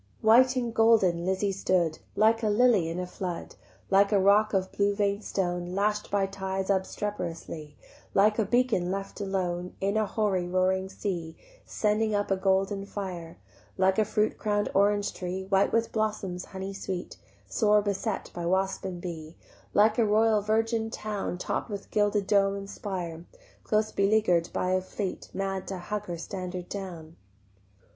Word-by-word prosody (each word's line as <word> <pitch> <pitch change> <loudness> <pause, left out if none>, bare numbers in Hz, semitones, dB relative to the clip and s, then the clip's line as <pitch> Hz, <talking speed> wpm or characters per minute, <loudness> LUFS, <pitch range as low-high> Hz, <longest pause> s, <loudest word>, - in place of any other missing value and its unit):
White 250 +4 +6
and 240 -2 -1
golden 195 -7 +4
Lizzie 190 +1 +1
stood, 180 -4 0 0.2
Like 225 +2 +4
a 215 - +1
lily 210 -6 +4
in 170 +2 -3
a 180 - -2
flood, 180 -1 -5 0.4
Like 200 +1 +5
a 205 - +4
rock 205 +3 +4
of 190 -2 0
blue 200 0 +1
vein'd 200 0 0
stone 175 -2 -2
Lash'd 210 +1 0
by 200 -1 +2
tides 190 0 -2
obstreperously, 170 -6 -3 0.4
Like 210 +3 +4
a 220 - +3
beacon 240 -5 +2
left 195 +2 -4
alone 180 -2 -2
In 200 +2 0
a 215 -1 +1
hoary 195 -5 0
roaring 185 +1 +1
sea, 175 -5 -4 0.3
Sending 215 0 +1
up 205 -1 -1
a - - +4
golden 195 +1 +1
fire, 180 -5 -6 0.4
Like 190 +2 +3
a - - +5
fruit 215 0 0
crown'd 205 -1 0
orange 205 +1 +2
tree 185 +1 -4
White 195 0 +3
with 230 0 +1
blossoms 210 -5 -2
honey 190 0 -6
sweet 185 -2 -5 0.3
Sore 210 -2 +3
beset 200 +1 -2
by 170 -1 -3
wasp 190 +2 0
and 185 -2 -4
bee, 165 -2 -7 0.4
Like 215 +2 +4
a - - +5
royal 215 0 +3
virgin 225 +1 0
town 210 -5 -4
Topp'd 180 - -3
with 200 -2 -7
gilded 205 -1 +2
dome 195 -1 +3
and 200 0 -6
spire 175 -5 -5 0.4
Close 215 -1 +1
beleaguer'd 195 -4 +2
by 185 - -1
a 185 0 +2
fleet 185 +1 -5
Mad 195 -1 -3
to 190 -2 -4
tug 210 +3 -4
her 175 -1 -4
standard 180 0 -6
down. 170 -5 -7
195 Hz, 165 wpm, -28 LUFS, 185-210 Hz, 0.4 s, White